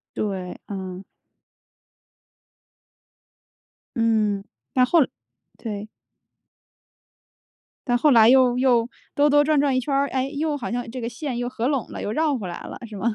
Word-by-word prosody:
对， 190 -4 -3
嗯。 190 -1 -6 2.9
嗯， 215 -4 +1 0.3
那 255 - +4
后 330 +7 +4
来 275 - +3 0.5
对。 210 -2 -6 2.0
但 245 -2 +2
后 300 +5 +4
来 225 -4 +7
又 255 -1 +5
又 245 -3 +3 0.3
兜 290 +1 +4
兜 290 0 +5
转 305 -1 +3
转 275 -2 +2
一 - - +2
圈 275 +2 -2
儿， 280 0 +2
哎， 265 0 -1
又 300 +1 -1
好 275 - -5
像 240 -1 -3
这 255 - -6
个 230 - -3
线 250 +2 -5
又 245 0 -2
合 245 0 -2
拢 275 -5 0
了 - - -6
又 - - -3
绕 305 +2 +1
回 200 -7 -5
来 175 - -7
了， - - -8
是 215 - -9
吗？ 220 +3 -1
245 Hz, 170 characters per minute, -23 LUFS, 220-275 Hz, 2.9 s, 来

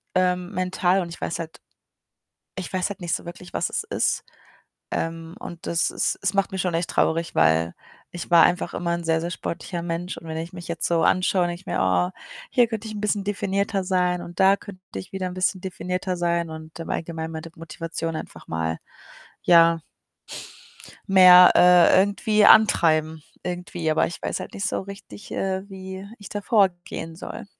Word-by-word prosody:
ähm, 180 0 +1
mental 185 0 +1
und 175 - -5
ich 170 - -10
weiß 165 - -3
halt 165 -1 -8 1.0
ich 190 - -5
weiß 185 +1 -1
halt 200 - -7
nicht 175 -1 -1
so - - -4
wirklich, 175 +1 -10
was 165 - -1
es - - -1
ist. 445 - -1 0.7
Ähm, 165 0 -3
und 170 -1 -9
das 170 - +1
ist - - -1
es 200 -1 +1
macht 195 0 +1
mich 190 - -2
schon 180 -3 -1
echt 170 +1 0
traurig, 165 +1 0
weil 80 +1 +3 0.4
ich 175 0 -7
war 170 -1 +8
einfach 175 0 +1
immer 170 -1 -1
'n 170 - -4
sehr, 160 0 +1
sehr 170 +1 -3
sportlicher 170 0 -5
Mensch 175 +1 -4
und 165 - -13
wenn 160 - -4
ich 165 +1 -6
mich 175 -1 -9
jetzt 170 -1 -2
so 170 -1 +2
anschaue, 185 0 +2
denke 175 +1 -5
ich - - -33
mir: - - -1
„Oh, 90 -1 +2 0.4
hier 245 -2 +4
könnte 225 -1 -5
ich 215 - -7
'n 210 - -5
bisschen 210 -1 0
definierter 200 0 -1
sein 180 -1 +1
und 175 0 -10
da 195 +1 +6
könnte 200 -2 -12 0.2
ich 95 - -7
wieder 190 -1 -3
'n 180 - -8
bisschen 185 0 0
definierter 185 0 -3
sein“, 170 -1 0
und 160 0 -10
im 165 - -7
Allgemeinen 160 -1 -4
meine 160 +1 -7
Motivation 165 0 -5
einfach - - -9
mal, 80 0 -2 0.6
ja 165 -1 +5 1.3
mehr, 180 -2 +9
äh, 180 0 +7
irgendwie 205 +2 +2
antreiben 160 -8 +5 0.2
irgendwie. 175 -2 -3
Aber 155 - +2
ich 170 - -8
weiß - - -3
halt - - -8
nicht 205 +2 -1
so - - -2
richtig, 200 +1 -11
äh, 190 0 -2
wie 190 0 -8
ich 205 -2 -11
da 205 - -4
vorgehen 175 -6 0
soll. 215 +6 -8
180 Hz, 190 wpm, -24 LUFS, 165-190 Hz, 1.3 s, mehr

